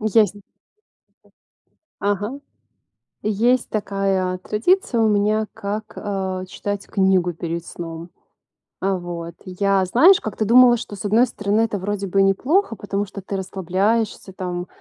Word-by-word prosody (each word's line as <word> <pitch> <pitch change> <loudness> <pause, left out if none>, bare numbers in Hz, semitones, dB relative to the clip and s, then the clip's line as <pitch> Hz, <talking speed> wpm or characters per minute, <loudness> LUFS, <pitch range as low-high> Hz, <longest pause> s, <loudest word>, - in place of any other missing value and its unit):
Езнь 210 -2 +2 1.6
Ага. 205 +6 -1 0.8
Есть 230 +4 +2
такая 195 -3 -1
традиция 235 - +1
у 220 - +4
меня, 210 +1 +2
как, 210 0 -5
э, 190 -2 -3
читать 205 +1 -4
книгу 190 -3 +2
перед 170 0 -4
сном. 165 0 -7 0.7
А 195 0 0
вот 170 -1 -6
я, 195 +1 +1
знаешь, 320 - +6
как-то 215 0 -3
думала, 240 +2 +7
что 220 -3 -7
с 200 - -8
одной 220 +5 +4
стороны 210 -2 0
это 220 -3 -1
вроде 200 +1 -3
бы 195 +2 +1
и - - +6
неплохо, 255 - +2
потому 205 -1 -3
что 200 +1 -8
ты 195 +1 -5
расслабляешься 195 +3 -1
там, 180 -1 -4
200 Hz, 135 wpm, -21 LUFS, 190-220 Hz, 1.6 s, думала